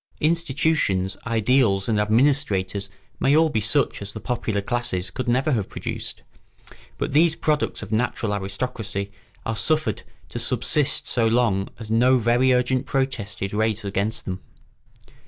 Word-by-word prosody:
Institutions, 150 - +1
ideals, 115 -3 +2
and 110 -2 +1
administrators 105 -4 +1 0.3
may 140 +2 +3
all 160 0 +4
be 110 -7 0
such 115 +5 +1
as 100 0 -4
the 110 - -6
popular 110 -3 -2
classes 100 -4 -2
could 130 - -4
never 130 +5 +2
have 110 -7 -1
produced; - - -5 0.7
but - - -2
these 160 +3 +4
products 150 -8 -1
of 105 - -9
natural 110 -1 0
aristocracy 100 0 -3 0.3
are 115 - -2
suffered 155 +7 +1 0.3
to - - -5
subsist 145 -2 +1
so 115 -3 +2
long 110 -4 +1
as 110 -1 -7
no 125 +3 +4
very 120 +2 +3
urgent 125 +1 +1
protest 130 -8 -2
is 100 - -3
raised 110 0 0
against 100 +3 -2
them. 95 0 -4
115 Hz, 145 wpm, -23 LUFS, 100-130 Hz, 0.7 s, all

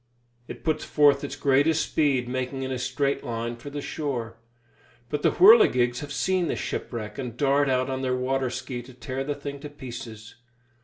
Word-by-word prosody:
It - - -9
puts 155 -2 0
forth 145 -2 +4
its 145 - -4
greatest 145 +4 +2
speed, 135 -5 +2
making 130 +1 -3
in 130 - -3
a 130 - -2
straight 140 +2 -1
line 115 0 -3
for 120 +5 -9
the 145 0 -5
shore. 120 -7 -4 0.7
But 150 +1 -2
the - - +3
whirligigs 130 - +6
have 145 -1 -7
seen 185 +4 0
the - - -1
shipwreck, 110 -1 -5
and 120 -3 -5
dart 140 0 +3
out 130 0 +1
on 130 0 -3
their 130 -1 0
water 130 0 0
ski 125 0 -5
to 125 +1 -14
tear 130 +2 -4
the 145 +1 -3
thing 140 0 -7
to 150 +1 -8
pieces. 120 -5 -9
135 Hz, 190 wpm, -26 LUFS, 125-145 Hz, 0.7 s, whirligigs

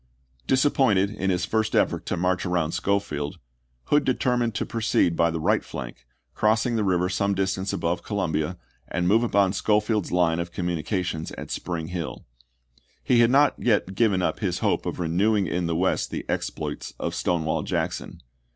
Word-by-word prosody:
Disappointed 130 -7 +3
in 95 -2 -2
his 90 -1 +1
first 110 -1 0
effort - - +1
to - - -1
march 90 +1 0
around 85 -4 0
Schofield, 80 -9 -1 0.5
Hood 145 - +2
determined 125 -3 0
to - - -1
proceed 110 -6 +1
by 85 0 +3
the 80 0 -3
right 80 - +2
flank, - - -8 0.3
crossing 110 +3 +2
the 110 - +1
river 90 -2 +2
some 100 +1 0
distance 95 0 -1
above 85 +1 -1
Columbia, 90 -4 -2 0.3
and 90 +1 -1
move 110 +5 +4
upon 100 -5 +2
Schofield's 105 0 +1
line 85 -2 +2
of 85 0 -4
com 90 0 -2
munications 85 -1 -2
at - - -7
Spring 85 -2 -4
Hill. 90 -3 -5 0.8
He 120 - +3
had 120 -1 +5
not 140 +3 +5
yet 105 -5 +1
given 100 -3 +2
up - - -1
his - - -1
hope - - 0
of - - -3
renewing 95 +5 +2
in 90 -1 -1
the 85 - -1
West 95 +3 +1
the - - -5
exploits - - -4
of - - -2
Stonewall 80 -3 0
Jackson. - - -3
95 Hz, 170 wpm, -25 LUFS, 85-110 Hz, 0.8 s, had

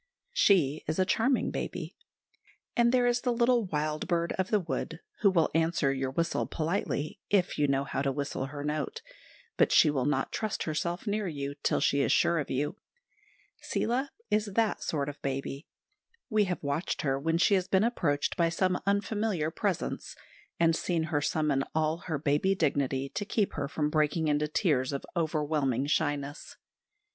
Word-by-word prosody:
She 175 - +3
is 155 - -1
a 185 - +3
charming 235 +7 +1
baby. - - -5 0.8
And 235 0 +4
there 250 -1 +3
is 245 0 +2
the 250 - +1
little 240 -1 +3
wild 155 -2 -2
bird 170 -2 0
of 185 - 0
the 210 - +3
wood, 175 - -4 0.2
who 200 - +5
will 170 -4 +2
answer 160 -3 +2
your 135 -1 -2
whistle 165 +5 -1
politely, 165 +1 -2
if 185 -6 +1
you 145 - +3
know 135 0 +1
how 135 - -3
to 140 -1 +1
whistle 140 -1 -3
her 145 +1 -6
note; 150 +1 -3 0.5
but - - +4
she 155 - +6
will 135 -2 0
not 135 -2 0
trust 215 -2 -2
herself 170 +4 -2
near 210 -1 -1
you 140 -3 -4
till - - +1
she 140 0 +2
is - - +2
sure 170 -1 +3
of 145 - -4
you. 145 +8 -1 0.8
Seela 255 +5 -1 0.2
is 210 0 +2
that 225 -2 +1
sort 145 -3 -1
of 145 -1 -7
baby. 135 +2 -4 0.6
We 215 -1 +4
have 180 -3 -3
watched 145 +5 -2
her 135 -2 +1
when 165 +3 +1
she 175 - +4
has 185 -2 +2
been 190 +1 +3
approached 165 -12 0
by 170 -1 +2
some 185 +2 0
unfamiliar 200 -5 0
presence, - - -2 0.4
and 165 -1 +4
seen 165 -1 0
her 145 - +2
summon 150 -2 +1
all 160 0 +1
her 160 -4 -1
baby 150 +7 +1
dignity 140 -5 0
to 205 - -3
keep 205 0 0
her 140 - -2
from 150 +1 -1
breaking 155 +1 +1
into 150 +1 +1
tears 145 -5 +1
of 140 - -4
overwhelming 150 -5 0
shyness. 145 -1 -2
160 Hz, 175 wpm, -29 LUFS, 145-190 Hz, 0.8 s, she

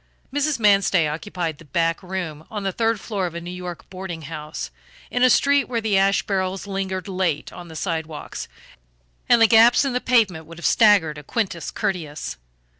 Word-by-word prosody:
Mrs. 290 -1 0
Manstey 195 -5 +4
occupied 165 0 -4
the 165 - -14
back 165 +3 0
room 180 -5 -5
on 210 -2 -5
the 195 - 0
third 225 +2 0
floor 195 -1 -2
of 170 - -8
a - - -3
New 175 +1 -7
York 180 -2 -7
boarding 185 -3 -6
house, 150 - -6 0.4
in 245 - -1
a 255 - +6
street 280 +2 +4
where 235 -2 -2
the 220 -3 0
ash 195 +1 +3
barrels 190 -1 -2
lingered 195 -1 -3
late 185 -5 -1
on 175 -1 -9
the 160 - -11
sidewalk 160 -3 -4 0.9
and 240 - +6
the 225 - +7
gaps 230 +4 +6
in 270 - -1
the 250 - 0
pavement 200 -10 +2
would 165 0 -11
have 175 - -7
staggered 195 -9 +4
a - - -12
Quintus 190 - -2
Curtius. 155 - -3
185 Hz, 190 wpm, -23 LUFS, 165-215 Hz, 0.9 s, the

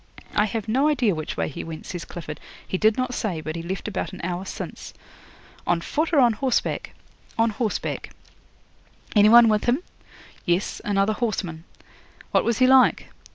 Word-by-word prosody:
'"I 210 - +4
have 220 0 -4
no 265 +7 +2
idea 250 -9 +2
which 155 -2 -5
way - - 0
he 140 - -6
went," 160 -1 -8
says 175 -4 -6
Clifford. 155 -3 -7 0.3
"He 185 - -2
did 220 0 +3
not 255 -1 -1
say, 200 -9 -2
but 155 0 -5
he 165 - -4
left 185 +5 -5
about 205 -2 -3
an 185 - -8
hour 180 +2 -3
since." - - -7 0.7
'"On 175 - +2
foot 310 - -1
or 310 - +4
on 240 -3 +5
horseback?" 255 +3 -1 0.4
'"On 225 0 +3
horseback." 215 0 -3 1.1
'"Any 210 0 +7
one 235 +1 +8
with 215 -1 +2
him?" 255 +8 +1 0.6
'"Yes, 175 +2 -1
another 200 +1 +1
horseman." 190 -8 -3 0.7
'"What - - +3
was 235 -1 +1
he 255 - +5
like?" 260 0 +5
210 Hz, 175 wpm, -24 LUFS, 175-240 Hz, 1.1 s, one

